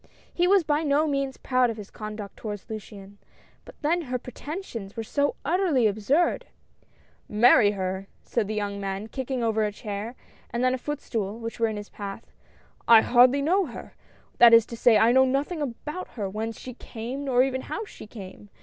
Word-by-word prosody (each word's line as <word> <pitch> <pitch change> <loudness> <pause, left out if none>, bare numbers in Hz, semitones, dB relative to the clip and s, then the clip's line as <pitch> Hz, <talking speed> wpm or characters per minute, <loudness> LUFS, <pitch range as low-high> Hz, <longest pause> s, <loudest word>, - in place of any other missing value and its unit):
He 355 0 +2
was 390 -1 +5
by 300 0 +1
no 295 0 +2
means 275 -3 -1
proud 255 -1 +2
of 225 - -4
his 210 -2 -9
conduct 215 -1 -7
toward 210 -2 -5
Luciane 200 -2 -9 0.2
— - - -32
but - - -14
then 335 +4 +2
her 255 -5 -3
pretensions 250 - -7
were 225 - -2
so 285 +5 0
utterly 325 - +2
absurd! 220 - +1 0.5
" - - -35
Marry 210 -4 +7
her! 190 0 -3
" - - -36
said 230 -4 -1
the 215 - -3
young 205 -1 -2
man, 195 +1 -3
kicking 260 0 -3
over 220 -1 +1
a 210 - 0
chair, 210 +3 -6 0.3
and 235 +1 -2
then 255 0 +3
a 260 - -2
footstool, 230 -7 -3
which 230 0 -6
were 230 - +3
in 215 -1 -3
his 205 0 -8
path. 200 +1 -8 0.6
I 230 -1 +9
hardly 255 +4 +5
know 365 +4 +2
her^ 240 - -9 0.2
— - - -32
that 235 -1 +9
is 230 -1 +6
to - - -3
say, 230 -1 +5
I 225 +3 +5
know 260 +1 +6
nothing 280 +5 -1
about 295 +6 -5
her, 205 -3 -2
whence 220 +3 -4
she 255 - -8
came, 245 +3 -6
nor 255 -2 +4
even 260 -1 -1
how 440 - -5
she 305 - -12
came 205 -1 -11
235 Hz, 205 wpm, -26 LUFS, 210-280 Hz, 0.6 s, I